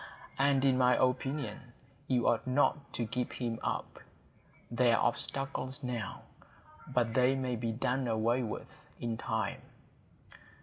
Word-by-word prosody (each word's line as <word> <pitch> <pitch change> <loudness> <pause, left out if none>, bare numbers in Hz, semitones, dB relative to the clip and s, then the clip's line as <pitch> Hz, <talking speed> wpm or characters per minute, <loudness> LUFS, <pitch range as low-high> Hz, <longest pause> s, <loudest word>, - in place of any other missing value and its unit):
And 140 -1 +4
in 130 -1 +4
my 125 -1 +5
opinion, 130 0 -1 0.3
you 125 -3 +2
ought 120 +2 +2
not 140 +2 +2
to 120 - -1
give 125 +3 -2
him 115 -2 -3
up. - - -3 0.7
There 120 -1 +4
are - - +1
obstacles 135 +2 -1
now; 120 -4 -4 0.6
but 115 -2 +1
they 130 +2 +4
may 130 -2 -1
be 115 0 -2
done 125 +3 0
away 115 +2 +2
with 115 -3 -4 0.3
in 115 -1 -2
time." 110 - -2
125 Hz, 135 wpm, -32 LUFS, 120-130 Hz, 0.7 s, my